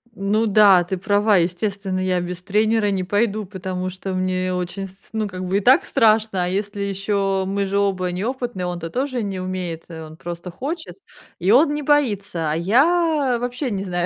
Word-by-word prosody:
Ну 210 Hz, +3 st, +1 dB
да, 200 Hz, -3 st, +6 dB
ты 185 Hz, +2 st, -3 dB
права, 205 Hz, +2 st, +3 dB
естественно, 185 Hz, +2 st, -1 dB
я 185 Hz, -1 st, +1 dB
без 175 Hz, 0 st, -5 dB
тренера 215 Hz, +3 st, +1 dB
не 190 Hz, -2 st, -1 dB
пойду, 210 Hz, +2 st, 0 dB
потому 185 Hz, -1 st, -4 dB
что 190 Hz, +1 st, -6 dB
мне 185 Hz, 0 st, -1 dB
очень 180 Hz, +2 st, -4 dB
с 190 Hz, -, -16 dB, 0.2 s
ну, 220 Hz, -1 st, -1 dB
как 185 Hz, -1 st, -6 dB
бы 185 Hz, +2 st, +1 dB
и -, -, +3 dB
так 255 Hz, +7 st, +5 dB
страшно, 215 Hz, -4 st, +2 dB
а -, -, -2 dB
если 200 Hz, +2 st, -3 dB
ещё 195 Hz, -1 st, -1 dB
мы 200 Hz, +1 st, -1 dB
же 200 Hz, +1 st, -1 dB
оба 190 Hz, -3 st, 0 dB
неопытные, 230 Hz, 0 st, -3 dB
он-то 175 Hz, -2 st, -4 dB
тоже 255 Hz, -, -2 dB
не 195 Hz, -2 st, -4 dB
умеет, 185 Hz, -3 st, -5 dB
он 160 Hz, -1 st, -9 dB
просто 175 Hz, +1 st, -7 dB
хочет 310 Hz, -, -5 dB, 0.4 s
и 185 Hz, +3 st, +1 dB
он 290 Hz, +5 st, +5 dB
не 295 Hz, 0 st, -3 dB
боится. 205 Hz, -, +1 dB
А -, -, 0 dB
я 280 Hz, -, +2 dB
вообще 250 Hz, +3 st, -3 dB
не 195 Hz, -1 st, -2 dB
знаю. 175 Hz, -2 st, -1 dB
195 Hz, 190 wpm, -21 LUFS, 185-220 Hz, 0.4 s, да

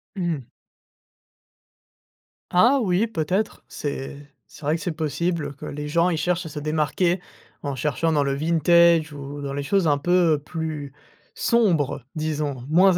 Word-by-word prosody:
Mmh. 165 Hz, -, -2 dB, 2.0 s
Ah 240 Hz, +10 st, +5 dB
oui, 190 Hz, +1 st, +2 dB
peut-être, 195 Hz, +1 st, -2 dB
c'est 145 Hz, 0 st, -6 dB
c'est 150 Hz, -, -15 dB
vrai 150 Hz, +2 st, +2 dB
que 170 Hz, -, -5 dB
c'est 180 Hz, -, -2 dB
possible, 155 Hz, -1 st, -2 dB
que -, -, -8 dB
les 150 Hz, +1 st, -5 dB
gens 170 Hz, +4 st, +2 dB
ils 165 Hz, -, 0 dB
cherchent 180 Hz, +2 st, 0 dB
à -, -, -7 dB
se 150 Hz, -, -9 dB
démarquer 155 Hz, +4 st, 0 dB, 0.4 s
en 140 Hz, -1 st, -3 dB
cherchant 150 Hz, +5 st, 0 dB
dans 145 Hz, -2 st, +2 dB
le 140 Hz, -, 0 dB
vintage 165 Hz, +1 st, +4 dB
ou 145 Hz, 0 st, -7 dB
dans 140 Hz, -, -3 dB
les 140 Hz, -, -2 dB
choses 185 Hz, +3 st, +1 dB
un 145 Hz, -1 st, +3 dB
peu 175 Hz, -1 st, +3 dB
plus 155 Hz, -3 st, -4 dB, 0.4 s
sombres 165 Hz, -, +2 dB
disons, 150 Hz, -5 st, -2 dB
moins 180 Hz, +3 st, +5 dB
155 Hz, 155 wpm, -24 LUFS, 145-175 Hz, 2.0 s, Ah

